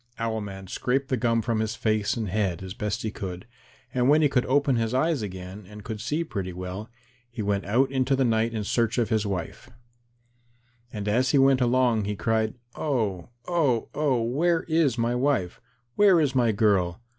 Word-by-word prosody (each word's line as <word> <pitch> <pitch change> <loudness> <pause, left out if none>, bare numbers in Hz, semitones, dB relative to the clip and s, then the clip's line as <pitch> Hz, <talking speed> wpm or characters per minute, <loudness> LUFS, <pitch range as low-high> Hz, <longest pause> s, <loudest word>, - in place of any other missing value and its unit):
Owl 115 -1 -2
man 95 -1 -7
scraped 130 +8 -1
the 130 - +2
gum 115 -2 +1
from 115 -1 0
his 110 0 -1
face 110 -1 0
and 110 -2 -2
head 95 -3 -1
as 95 -1 -6
best 105 +1 -3
he 110 - -2
could, 95 -1 -6 0.5
and 125 +1 +2
when 155 +2 +5
he 145 - +4
could 125 -2 +1
open 140 0 +2
his 115 +1 -1
eyes 155 0 +1
again 95 0 -7
and 105 -1 -11
could 110 -1 -6
see 155 +3 -1
pretty 95 - -5
well, 90 +4 -6 0.4
he 115 -2 -5
went 100 -1 -1
out 130 +7 +2
into 135 0 +1
the 135 0 +2
night 115 0 +1
in 110 -2 -3
search 115 +3 0
of 120 -3 +1
his 110 -3 +1
wife. 90 -4 -5 1.2
And 105 -2 -5
as 125 +5 +2
he 140 - +3
went 135 -1 +4
along 120 -3 +2
he 105 +1 -2
cried, 110 +1 0 0.2
"Oh, 110 - -2 0.2
oh, 145 -10 +1
oh, 135 -6 +1
where 165 +8 +1
is 160 -7 +1
my 115 +1 +1
wife? 125 -8 0 0.3
Where 195 -1 +5
is 145 -4 +1
my 120 -4 +3
girl? 100 -5 +1
115 Hz, 195 wpm, -26 LUFS, 105-130 Hz, 1.2 s, when